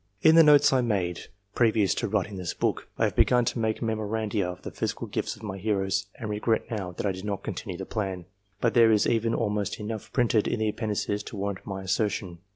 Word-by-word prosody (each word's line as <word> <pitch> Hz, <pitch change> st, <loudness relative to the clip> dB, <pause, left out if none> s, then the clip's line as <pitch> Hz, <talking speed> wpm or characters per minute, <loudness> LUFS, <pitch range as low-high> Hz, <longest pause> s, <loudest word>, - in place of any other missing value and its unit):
In 160 Hz, -, +7 dB
the 165 Hz, -, +9 dB
notes 150 Hz, -3 st, +6 dB
I 130 Hz, -, +4 dB
made, 95 Hz, -7 st, -1 dB, 0.3 s
previous 110 Hz, -6 st, +3 dB
to -, -, -2 dB
writing 100 Hz, -1 st, -1 dB
this 90 Hz, -2 st, -4 dB
book, -, -, -1 dB
I -, -, +1 dB
had -, -, +1 dB
begun 125 Hz, -1 st, +4 dB
to 115 Hz, -, -1 dB
make 110 Hz, +1 st, -1 dB
memoranda 110 Hz, -1 st, -1 dB
of 90 Hz, 0 st, -8 dB
the -, -, -6 dB
physical -, -, -3 dB
gifts -, -, -3 dB
of -, -, -16 dB
my 100 Hz, -2 st, -5 dB
heroes, 95 Hz, -2 st, 0 dB
and 110 Hz, -, -6 dB
regret 110 Hz, +3 st, -1 dB
now, 100 Hz, -5 st, -3 dB
that 90 Hz, -, -4 dB
I 100 Hz, -, +2 dB
did 95 Hz, 0 st, -7 dB
not 105 Hz, -2 st, -3 dB
continue 90 Hz, -4 st, -5 dB
the 95 Hz, -, -5 dB
plan, 95 Hz, -5 st, -3 dB, 0.3 s
but 115 Hz, -, +1 dB
there 115 Hz, -2 st, +6 dB
is 105 Hz, -2 st, +4 dB
even 115 Hz, 0 st, +1 dB
almost 105 Hz, -3 st, -1 dB
enough 110 Hz, 0 st, -5 dB
printed 115 Hz, -4 st, +2 dB
in -, -, 0 dB
the 110 Hz, 0 st, 0 dB
Appendices 105 Hz, -1 st, -2 dB
to -, -, -8 dB
warrant 100 Hz, -1 st, -4 dB
my 95 Hz, -1 st, -5 dB
assertion. 95 Hz, -2 st, -1 dB
105 Hz, 225 wpm, -27 LUFS, 95-115 Hz, 0.3 s, the